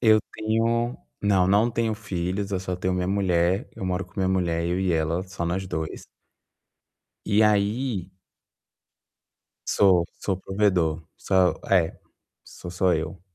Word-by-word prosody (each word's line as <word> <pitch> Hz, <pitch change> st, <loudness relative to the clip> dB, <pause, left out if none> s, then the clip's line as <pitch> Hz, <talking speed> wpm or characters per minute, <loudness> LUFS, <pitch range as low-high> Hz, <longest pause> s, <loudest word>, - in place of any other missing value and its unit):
Eu 110 Hz, -2 st, +5 dB
tenho 115 Hz, +2 st, 0 dB, 0.3 s
não, 95 Hz, -3 st, +3 dB
não 105 Hz, +5 st, +3 dB
tenho 115 Hz, -1 st, 0 dB
filhos, 95 Hz, -1 st, -3 dB
eu 95 Hz, -, 0 dB
só 90 Hz, -1 st, -3 dB
tenho 95 Hz, 0 st, -1 dB
minha 90 Hz, 0 st, -1 dB
mulher, 95 Hz, -, +1 dB
eu -, -, -5 dB
moro 90 Hz, +1 st, -1 dB
com 90 Hz, -, -25 dB
minha 95 Hz, -1 st, +1 dB
mulher. 85 Hz, -3 st, 0 dB
Eu 90 Hz, +2 st, 0 dB
e 95 Hz, -1 st, +1 dB
ela, 80 Hz, +2 st, 0 dB
só 95 Hz, -2 st, -5 dB
nós 90 Hz, +3 st, -2 dB
2. 80 Hz, -2 st, -5 dB, 1.2 s
E 105 Hz, +2 st, +3 dB
aí 105 Hz, -1 st, +1 dB, 1.6 s
Sou, 95 Hz, -4 st, +4 dB
sou 95 Hz, -, -1 dB
o -, -, -14 dB
provedor, 90 Hz, -5 st, +1 dB
sou, 95 Hz, -2 st, +2 dB
é, 90 Hz, -4 st, +2 dB, 0.5 s
sou 90 Hz, -, -10 dB
só 90 Hz, 0 st, +2 dB
eu. 80 Hz, +3 st, -4 dB
95 Hz, 150 wpm, -25 LUFS, 90-105 Hz, 1.6 s, Eu